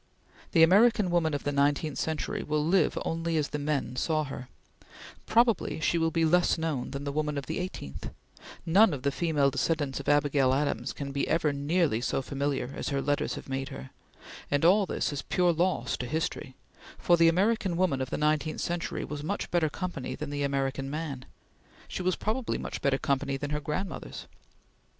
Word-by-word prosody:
The 165 - +6
American 205 +2 +5
woman 160 -3 +2
of 145 - -4
the 145 - -1
nineteenth 145 +1 +1
century 160 -1 -2
will 150 0 -1
live 185 +3 +2
only 165 0 -1
as 150 -1 0
the 150 - -3
man 145 -4 -1
saw 155 +2 +1
her; 130 -3 -7 0.8
probably 230 -6 +2
she 170 +1 +1
will 165 0 +2
be 165 0 +1
less 175 +2 +3
known 160 -6 -2
than 140 +1 -5
the 140 - -3
woman 150 0 -1
of 140 - -3
the - - -3
eighteenth; 75 - -6 0.6
none 190 +1 +5
of 130 - -9
the 140 - +2
female 145 -3 +1
descendants 145 -3 -1
of 140 - -3
Abigail 145 -3 +3
Adams 140 +1 -1
can 140 -1 -6
ever 160 -2 +2
be 140 - -5
nearly 150 -5 +1
so 135 - -1
familiar 140 -1 -2
as - - -3
her 140 -1 0
letters 145 +2 0
have - - -9
made 135 0 -3
her; 65 +2 -9 0.6
and 145 +2 +1
all 195 +3 +5
this - - -1
is 140 - -3
pure 180 -1 +2
loss 180 +3 0
to 125 - -4
history, 155 -3 -3 0.4
for 175 - +4
the 165 -1 +5
American 190 +1 +2
woman 170 -8 +1
of 130 - -3
the - - -2
nineteenth 155 +1 0
century 175 0 -2
was 150 -1 -6
much 200 +7 -3
better 170 -3 +2
company 175 -5 -4
than 150 -1 -6
the 145 0 -3
American 135 -1 -1
man; 145 -4 -4 0.6
she - - -5
was 185 0 +1
probably 230 +3 -2
much - - -5
better 140 -1 +2
company 135 0 -1
than 145 +1 -4
her 150 - 0
grandmothers. 170 +7 -5
150 Hz, 190 wpm, -28 LUFS, 140-170 Hz, 0.8 s, The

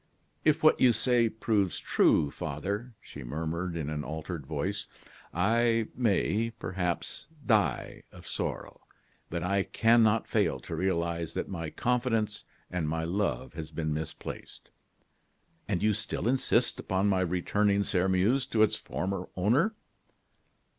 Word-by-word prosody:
"If 155 -1 +3
what 155 - +6
you 125 -2 +6
say 120 +1 +3
proves 105 -4 0
true, 70 - +3
father," 100 - -4
she 70 - -10
murmured, 80 +6 -3
in 75 -3 -3
an 75 -1 -3
altered 80 -1 -5
voice, - - -2 0.4
"I 115 +5 +2
may, 115 -1 +1
perhaps, 90 -2 -3 0.2
die 105 - +1
of - - -13
sorrow; - - -4 0.5
but 85 0 -3
I 100 +2 +2
cannot 115 +1 +3
fail - - +1
to - - -5
realize 85 -3 -1
that - - -2
my 85 -4 -4
confidence 115 -1 0 0.3
and 85 -4 -1
my 80 +1 -1
love 85 -7 -1
has 80 -1 -6
been 80 -2 -2
misplaced." 80 0 -7 1.0
"And 85 - -1
you 105 0 +4
still 110 +2 -2
insist 130 +2 +2
upon 95 +1 0
my 100 -2 +3
returning 100 +3 +1
Sairmeuse 95 +8 +2
to 110 -1 +3
its 110 - +2
former 95 +1 -4
owner?" 130 - +2
95 Hz, 135 wpm, -29 LUFS, 85-115 Hz, 1.0 s, what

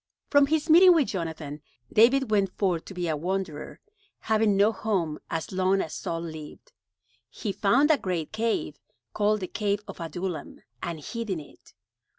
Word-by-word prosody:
From 285 -1 +6
his 310 +1 0
meeting 350 +2 +8
with 300 -5 +2
Jonathan, 160 -5 -5 0.3
David 245 +2 +4
went 200 -2 +1
forth 180 -5 0
to - - -9
be 175 -1 -2
a 160 - 0
wanderer, 175 -1 -4 0.4
having 215 -2 +2
no 205 +2 +5
home 185 -9 -2
as 165 -1 -3
long 190 +1 +2
as 160 - -3
Saul 165 0 -4
lived. 155 -3 -9 0.6
He 210 - -4
found 250 +11 +3
a 295 - +3
great 175 -5 -3
cave, 225 +1 -1 0.3
called 210 0 +1
the 185 - -3
cave 205 0 -1
of - - -9
Adullam, 170 -1 -5 0.2
and 170 -2 -4
hid 230 +5 -5
in 185 -4 -1
it. 145 - -16
195 Hz, 165 wpm, -27 LUFS, 165-220 Hz, 0.6 s, meeting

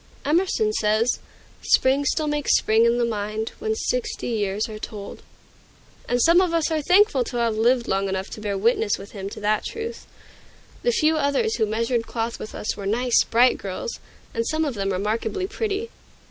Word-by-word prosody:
Emerson 380 +8 +1
says: 215 - +1 0.4
"Spring 270 +2 +3
still 310 +2 +1
makes 295 -1 +2
spring 220 +1 +3
in 235 +1 +2
the 240 - +2
mind, 215 0 -3
When 440 0 -1
sixty 450 - -2
years 210 -2 -1
are 215 -1 -8
told;" 205 -2 -8 0.9
and 245 - +1
some 335 +7 +5
of 350 -3 +1
us 330 0 +1
are 315 -1 +1
thankful 360 - +4
to 245 - -5
have 230 -2 +1
lived 235 +2 +2
long 195 0 0
enough 190 +1 -2
to 215 - -7
bear 205 -2 -2
witness 220 0 +2
with 195 - -11
him 195 -2 -6
to - - -9
that 210 +1 +1
truth. 460 +1 -6 0.7
The 485 - +1
few 320 -8 +2
others 305 +10 +1
who 220 - +1
measured 230 +2 -1
cloth 230 0 -3
with 215 - -8
us 210 - -3
were 200 -1 -5
nice, 240 +3 +3
bright 245 +2 +3
girls, 485 - -5 0.3
and 230 0 -1
some 315 0 0
of 285 - -2
them 195 -2 -2
remarkably 215 - -1
pretty. 425 +2 -3
235 Hz, 190 wpm, -23 LUFS, 215-325 Hz, 0.9 s, some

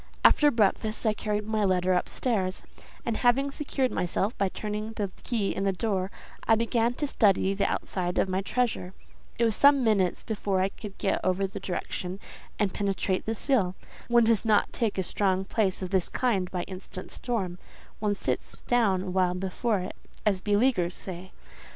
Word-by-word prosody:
After 295 - +7
breakfast 220 -1 +1
I 215 - +4
carried 210 -1 -2
my 215 -1 0
letter 185 -1 +2
up 180 - 0
stairs, 195 -7 -1 0.4
and 230 - -1
having 270 +3 +3
secured 275 -3 -1
myself 190 +5 0
by 195 -1 +1
turning 210 +2 -4
the 205 -3 -3
key 220 -5 -1
in 195 - -1
the 195 - +2
door, 190 -1 -1 0.4
I 225 - +6
began 230 +1 +1
to 295 - -1
study 200 -7 +3
the 200 - 0
outside 180 -2 -2
of - - +3
my 190 +1 0
treasure: 205 -4 -1 0.4
it 235 - +3
was 225 -2 +1
some 280 0 +6
minutes 200 -6 +2
before 200 -3 -1
I 190 +1 +2
could 200 -1 -10
get 195 - 0
over 185 +1 +1
the 190 - -6
direction 185 0 -4 0.4
and 200 -3 0
penetrate 195 -1 -1
the 225 - 0
seal; 210 -8 +1 0.3
one 235 0 +5
does 225 -2 +3
not 215 -2 +2
take 225 -5 -1
a 190 - +1
strong 190 0 +1
place 195 -3 0
of 185 - -5
this 190 -3 +2
kind 200 -8 0
by 180 -2 -3
instant 185 0 -8
storm—one 205 -1 -4
sits - - -2
down 205 -7 +2
awhile 185 -1 +1
before 195 +3 -1
it, 185 - -6 0.3
as 195 -3 +2
beleaguers 205 -4 +2
say. 185 0 -8
200 Hz, 175 wpm, -28 LUFS, 185-225 Hz, 0.4 s, After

